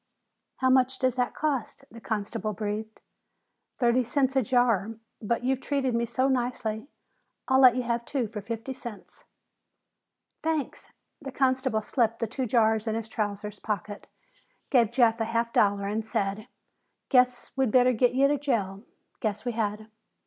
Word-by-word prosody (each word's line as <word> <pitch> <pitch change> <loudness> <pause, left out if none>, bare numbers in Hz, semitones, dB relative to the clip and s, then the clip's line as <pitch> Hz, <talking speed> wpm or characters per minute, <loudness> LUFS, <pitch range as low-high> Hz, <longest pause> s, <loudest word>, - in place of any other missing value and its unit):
"How 260 0 +2
much 260 0 +3
does 255 -2 +1
that 250 -1 0
cost?" 280 -2 -2
the 230 - -12
constable 215 0 -3
breathed. 215 +1 -5 0.8
"Thirty 245 0 +3
cents 265 +2 0
a 265 - +4
jar, 230 -4 +1 0.3
but 235 +2 -1
you've 265 +1 0
treated 270 -2 -1
me 235 0 0
so 255 +3 +1
nicely, 245 -3 -1 0.6
I'll 260 0 +4
let 255 -2 +7
you 255 - -1
have 235 0 -1
two 260 -1 -2
for 210 0 -6
fifty 230 +5 -5
cents." 245 - -10 1.2
"Thanks." 315 -4 -3 0.3
The 275 -2 -6
constable 260 -4 +1
slipped 230 -1 0
the 230 - -1
two 255 +3 -3
jars 220 -1 +2
into 220 0 0
his 225 -1 -8
trousers 210 -1 -4
pocket, 205 -1 -4 0.6
gave 240 -6 +4
Jeff 235 -2 +3
a 225 - 0
half 230 +1 -1
dollar, 200 -1 +3
and 215 +2 -2
said, 205 0 -2 0.6
"Guess 250 -2 +3
we'd 265 -3 +2
better 250 +2 +4
get 245 +1 +3
to 275 +3 +3
jail." 205 -9 -1 0.4
"Guess 215 0 -3
we 245 - 0
had." 215 -1 -2
235 Hz, 155 wpm, -27 LUFS, 215-260 Hz, 1.2 s, let